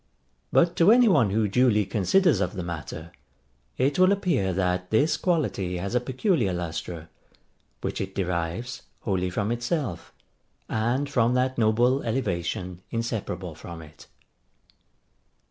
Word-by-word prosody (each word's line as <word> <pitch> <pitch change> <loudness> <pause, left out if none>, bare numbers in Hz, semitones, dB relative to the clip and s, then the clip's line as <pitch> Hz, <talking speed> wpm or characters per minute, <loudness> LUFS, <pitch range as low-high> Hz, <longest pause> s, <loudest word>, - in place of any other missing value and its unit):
But 170 0 +3
to 175 +5 +6
any 245 0 +6
one 120 - +4
who 105 +2 +1
duly 105 -1 +3
considers 115 - +2
of 90 -2 -1
the 90 - -4
matter, 85 0 -6 0.7
it 140 +5 +1
will 185 +1 +6
appear 170 - +1
that 90 0 -1
this 140 +9 +3
quality 125 - -1
has 100 +5 -4
a 125 - +3
peculiar 130 - 0
lustre, 85 -1 -5 0.7
which - - -3
it 95 0 -5
derives 90 +5 -3 0.2
wholly 95 -3 -1
from 100 +4 -1
itself, 120 - -3 0.6
and 120 +6 0
from 125 -3 +2
that 130 0 0
noble 120 +5 +3
elevation 90 -6 -2
inseparable 105 -7 -3
from 80 +1 -9
it. 75 0 -15
110 Hz, 130 wpm, -26 LUFS, 90-130 Hz, 0.7 s, to